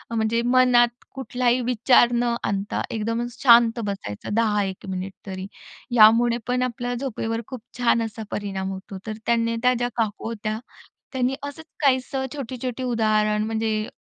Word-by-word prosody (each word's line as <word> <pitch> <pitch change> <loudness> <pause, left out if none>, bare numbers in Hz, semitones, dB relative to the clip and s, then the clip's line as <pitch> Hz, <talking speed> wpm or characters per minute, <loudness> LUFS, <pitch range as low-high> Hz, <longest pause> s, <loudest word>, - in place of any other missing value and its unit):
म्हणजे 225 +1 +1
मनात 245 -1 +5 0.3
कुठलाही 250 -2 0
विचार 245 0 +4
न 240 0 +1
आणता 200 0 -2
एकदम 230 +2 -2
शांत 235 -2 +5
बसायचं 195 - -5
10-1 210 -4 0
मिनिट 190 +1 -4
तरी. 190 0 -5 0.5
यामुळे 230 +2 +6
पण 250 0 +1
आपल्याला 245 0 -3
झोपेवर 225 -2 -3
खूप 255 -3 -7 0.2
छान 240 -1 +3
असा 220 0 -7
परिणाम 195 -2 -3
होतो. 190 +1 -8
तर 215 -1 -4
त्यांनी 230 -1 +1
त्या 250 0 +5
ज्या 245 0 -1
काकू 220 -2 -2
होत्या, 215 -1 -3 0.5
त्यांनी 260 0 0
असंच 285 +3 -7 0.2
काहीसं 265 0 +1
छोटी-छोटी 255 -2 -5
उदाहरण; 215 -3 +1
म्हणजे 220 -1 -1
230 Hz, 140 wpm, -23 LUFS, 215-245 Hz, 0.5 s, यामुळे